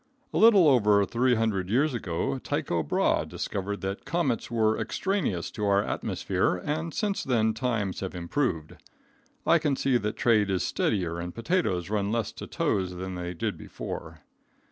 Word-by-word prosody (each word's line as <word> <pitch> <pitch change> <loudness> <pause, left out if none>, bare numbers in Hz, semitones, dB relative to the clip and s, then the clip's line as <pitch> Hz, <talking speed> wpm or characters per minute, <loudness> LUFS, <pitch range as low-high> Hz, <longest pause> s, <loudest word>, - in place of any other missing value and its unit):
A - - 0
little 205 -6 +7
over 105 -7 +5
300 115 -6 +1
years 135 +7 +2
ago 85 - -2
Tycho 85 - -1
Brahe 75 - +1
discovered 100 +1 -4
that 95 +1 -4
comets 160 -9 -1
were 110 -2 +2
extraneous 185 - -1
to 105 - -3
our 100 0 +3
atmosphere, 90 - -1
and 155 - -3
since 205 +3 -1
then 110 -4 +2
times 110 -5 -1
have 95 -1 -5
improved. 85 - -2 0.7
I - - +5
can 145 -2 +1
see 130 -1 +2
that 105 0 -3
trade 110 -4 +3
is 95 -2 0
steadier 85 -5 -1
and 85 +1 -6
potatoes 115 - 0
run 105 -1 0
less 115 -3 -1
to - - -9
tows 95 -2 -1
than 95 +1 -5
they 90 0 -5
did - - -3
before. - - -7
105 Hz, 160 wpm, -27 LUFS, 95-130 Hz, 0.7 s, little